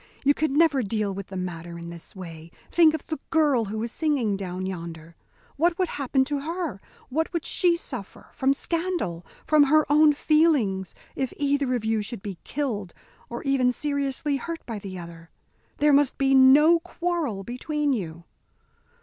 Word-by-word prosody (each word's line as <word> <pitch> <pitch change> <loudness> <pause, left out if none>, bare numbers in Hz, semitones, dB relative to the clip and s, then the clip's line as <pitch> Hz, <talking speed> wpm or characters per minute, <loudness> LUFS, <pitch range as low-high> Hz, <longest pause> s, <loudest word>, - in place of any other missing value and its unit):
You 285 +1 +5
can 295 -1 -1
never 310 -5 +4
deal 210 -2 -1
with 195 0 -6
the 190 - -7
matter 170 -2 -5
in 170 0 -8
this 170 +3 -10
way. 165 -3 -9 0.2
Think 320 -2 +5
of 315 - -7
the 315 - -4
girl 290 -8 +3
who 215 +2 -4
is 235 - -4
singing 275 -11 0
down 185 -1 -4
yonder. 165 -3 -7 0.4
What 335 +3 +2
would 370 -3 0
happen 265 -1 0
to 290 0 -2
her, 315 - -4 0.3
what 320 +5 -1
would 340 -2 -3
she 350 -2 +2
suffer, 250 - -6
from 265 +1 +2
scandal, 330 - -2 0.2
from 305 -2 +5
her 310 +2 +4
own 300 0 +6
feelings, 285 - +2 0.2
if 265 -2 -2
either 280 -2 +1
of 225 -3 -3
you 220 -1 +1
should 210 -1 -6
be 195 -4 -6
killed, 225 -11 -3 0.3
or 235 - -6
even 270 -3 +2
seriously 280 +1 -1
hurt 330 +5 -6
by 225 -3 -5
the 195 -2 -7
other? 165 -1 -10 0.5
There 295 0 +4
must 280 -1 +3
be 270 0 +2
no 285 +6 +7
quarrel 335 - -3
between 290 +5 -1
you." 170 -7 -5
265 Hz, 175 wpm, -25 LUFS, 195-305 Hz, 0.5 s, no